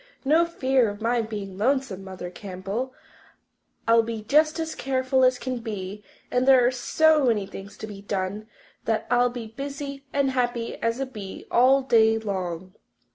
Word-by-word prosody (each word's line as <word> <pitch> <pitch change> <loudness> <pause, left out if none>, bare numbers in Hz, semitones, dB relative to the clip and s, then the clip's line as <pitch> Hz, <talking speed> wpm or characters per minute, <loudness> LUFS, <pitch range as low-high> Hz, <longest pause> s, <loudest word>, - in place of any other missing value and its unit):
"No 320 +5 +4
fear 260 -7 +2
of 205 0 -7
my 235 +1 +1
being 205 -4 -6
lonesome, 250 -5 0
Mother 185 -2 -7
Campbell. 195 +7 -5 1.0
I'll 230 0 +6
be 225 -1 -5
just 305 +7 +3
as 320 -1 -2
careful 260 0 +1
as 255 0 +4
can 255 -1 -4
be 205 -3 -6 0.3
and 250 +1 +1
there 260 -2 +7
are 245 - +4
so 305 +4 +3
many 215 -4 +2
things 195 +1 -10
to - - -6
be 205 -2 -9
done 200 +1 -3 0.4
that 225 -1 0
I'll 245 0 +4
be 240 -2 -6
as 220 - -12
busy 280 0 -6
and 280 -1 +1
happy 245 -2 -1
as 230 +2 0
a 270 - 0
bee 210 -7 -8
all 265 +3 +5
day 225 -3 +4
long. 185 -4 -4
235 Hz, 175 wpm, -25 LUFS, 205-265 Hz, 1.0 s, there